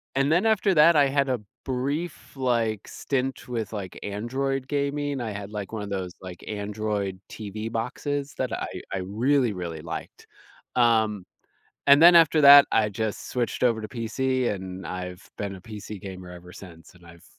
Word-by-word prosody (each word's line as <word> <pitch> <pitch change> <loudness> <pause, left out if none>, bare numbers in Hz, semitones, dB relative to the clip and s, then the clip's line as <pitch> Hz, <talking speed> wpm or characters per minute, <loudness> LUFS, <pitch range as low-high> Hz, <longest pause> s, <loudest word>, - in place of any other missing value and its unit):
and 135 +2 +2
then 175 +6 +3
after 215 -3 +3
that 165 +1 +6
I 145 -2 +5
had 140 0 +1
a 125 -3 0 0.3
brief, 140 +7 -3
like, 115 -5 0
stint 135 -1 -3
with, 115 -3 -4
like, 95 -4 -6
Android 130 +6 -2
gaming. 145 0 -1
I 110 - -3
had, 100 0 -7
like, 105 -2 -5
one 110 - -3
of 100 - -6
those, 95 -2 -4
like, 90 -2 -9
Android 105 -2 -3
TV 110 +1 -6
boxes 140 +5 -3
that 130 -2 -2
I - - -3 0.3
I 95 - -1
really, 120 +4 +1
really 85 -4 -5
liked, 85 0 -8 0.5
um, 110 -5 +2 0.6
and 140 +2 +7
then 175 +1 +9
after 165 -1 +6
that 140 0 +10
I 110 -1 +3
just 110 +1 -4
switched 120 -4 -2
over 115 -3 +2
to 110 - -6
PC 125 +2 -1
and 95 -1 -7
I've 90 0 -6
been 100 -1 -3
a - - -12
PC 105 +1 -8
gamer 95 -3 -8
ever 90 0 -11
since, 85 -4 -13
and 90 -1 -18
I've 85 0 -15
110 Hz, 175 wpm, -26 LUFS, 100-135 Hz, 0.6 s, that